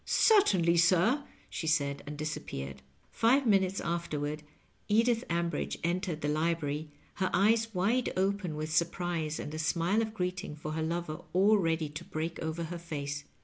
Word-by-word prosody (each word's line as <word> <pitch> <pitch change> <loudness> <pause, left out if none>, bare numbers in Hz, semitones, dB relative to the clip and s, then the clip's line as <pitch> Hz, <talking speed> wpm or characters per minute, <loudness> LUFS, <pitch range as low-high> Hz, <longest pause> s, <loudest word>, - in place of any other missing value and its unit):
^^ - - -37
Cer 435 -2 +5
tainly, 170 - +3
sir," 185 - +4 0.2
she 160 - -5
said, 140 -3 +1
and 150 0 -6
disappeared. 70 - -5 0.3
Five 255 +5 +3
minutes 195 -3 +3
afterward 155 -3 -2 0.5
Edith 230 +2 +3
Ambridge 170 0 -1
entered 175 -1 -1
the 150 - -1
libraiy, 155 -1 -1 0.3
her 190 -1 +1
eyes 225 +4 +3
wide 225 +8 +1
open 190 -3 0
with 155 +1 -3
surprise 170 -2 0
and 150 - -5
a 155 - -4
smile 170 +7 +1
of 220 -1 -3
greeting 180 -3 -3
for 155 0 -6
her 160 +1 -2
lover 160 -1 -3
all 200 +4 +5
ready 165 -3 0
to 150 +1 -8
break 160 +2 -4
over 160 +1 -3
her 170 +1 -5
face. 145 -3 -5
170 Hz, 165 wpm, -31 LUFS, 155-195 Hz, 0.5 s, Cer